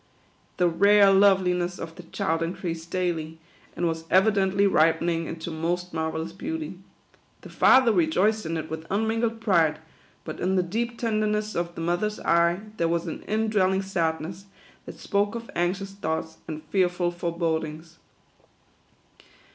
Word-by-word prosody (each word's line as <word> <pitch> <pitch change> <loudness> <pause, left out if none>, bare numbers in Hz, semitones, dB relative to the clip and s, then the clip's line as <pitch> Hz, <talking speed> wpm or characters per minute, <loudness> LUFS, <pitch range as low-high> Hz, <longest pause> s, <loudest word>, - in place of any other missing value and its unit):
The 180 - +3
rare 200 +4 +5
loveliness 185 -2 +3
of 165 0 -7
the 180 - -11
child 165 -1 -2
increased 165 -1 -4
daily, 165 -3 -2 0.4
and 175 - -1
was 165 0 -3
evidently 195 0 +3
ripening 165 -1 +2
into 165 +1 -6
most 175 +2 -2
marvellous 160 +1 -3
beauty. 305 - -5 0.6
The - - -11
father 260 -3 +5
rejoiced 195 +4 +2
in 165 0 -2
it 160 0 -4
with 160 +1 -7
unmingled 225 +2 0
pride; 170 -8 +3 0.5
but - - -6
in 190 +1 0
the 185 - +3
deep 235 +6 -3
tenderness 215 -2 0
of 170 0 -3
the - - -5
mother's 175 +6 -1
eye 170 +2 +2 0.2
there 165 - +1
was 170 0 0
an 165 - -5
in 220 +1 0
dwelling 190 -2 +2
sadness, 175 0 -2 0.4
that - - -9
spoke 205 +2 0
of 230 0 -7
anxious 185 +3 -1
thoughts 160 -4 -4
and 155 -1 -6
fearful 180 -2 +1
forebodings. 165 -2 -3
175 Hz, 145 wpm, -25 LUFS, 165-200 Hz, 0.6 s, rare